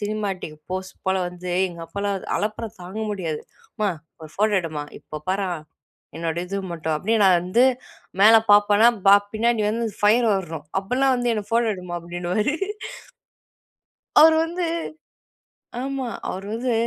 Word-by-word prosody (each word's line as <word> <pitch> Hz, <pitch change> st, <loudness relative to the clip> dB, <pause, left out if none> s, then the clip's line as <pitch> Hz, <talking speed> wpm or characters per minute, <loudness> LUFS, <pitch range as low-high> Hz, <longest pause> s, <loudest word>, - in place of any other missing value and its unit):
Cinematic 205 Hz, -6 st, -3 dB, 0.2 s
post 190 Hz, +1 st, -5 dB
போல 190 Hz, -, +2 dB
வந்து, 180 Hz, 0 st, -6 dB, 0.2 s
எங்க 170 Hz, -1 st, -10 dB
அப்பாலாம், 200 Hz, +3 st, -2 dB, 0.2 s
அலப்பறை 215 Hz, +2 st, -3 dB
தாங்க 185 Hz, +5 st, -7 dB
முடியாது. 165 Hz, -6 st, -3 dB, 0.4 s
அம்மா 210 Hz, -3 st, +1 dB, 0.3 s
ஒரு 155 Hz, -, -10 dB
ஃபோட்டோ 210 Hz, 0 st, +2 dB
எடுமா. 155 Hz, -3 st, -4 dB, 0.2 s
இப்போ 155 Hz, -, -9 dB
பார்றா 190 Hz, 0 st, 0 dB, 0.7 s
என்னோட 165 Hz, 0 st, -3 dB
இது 200 Hz, +2 st, -4 dB, 0.2 s
மட்டும், 160 Hz, -1 st, -2 dB
அப்டின்னு 215 Hz, +6 st, +1 dB
நான் 185 Hz, -2 st, +6 dB
வந்து 185 Hz, +8 st, +2 dB, 0.6 s
மேல 220 Hz, +2 st, +8 dB, 0.2 s
பார்ப்பனா, 205 Hz, +2 st, +6 dB, 0.4 s
பின்னாடி 230 Hz, 0 st, +1 dB
வந்து 230 Hz, +1 st, -1 dB, 0.2 s
ஃபயர் 225 Hz, +3 st, +4 dB
வர்றணும். 160 Hz, -5 st, -4 dB
அப்போலாம் 260 Hz, +6 st, +1 dB
வந்து, 245 Hz, -1 st, 0 dB
என்ன 210 Hz, -, -3 dB
ஃபோட்டோ 230 Hz, 0 st, +2 dB
எடுமா 180 Hz, -1 st, -7 dB
அப்படின்னுவாரு. 175 Hz, -, -1 dB, 1.7 s
அவரு 320 Hz, +1 st, +8 dB
வந்து 350 Hz, +2 st, -4 dB, 1.2 s
ஆமா. 270 Hz, -1 st, -3 dB, 0.2 s
அவரு 190 Hz, +2 st, -5 dB
வந்து 245 Hz, +2 st, -1 dB
200 Hz, 135 wpm, -23 LUFS, 180-225 Hz, 1.7 s, மேல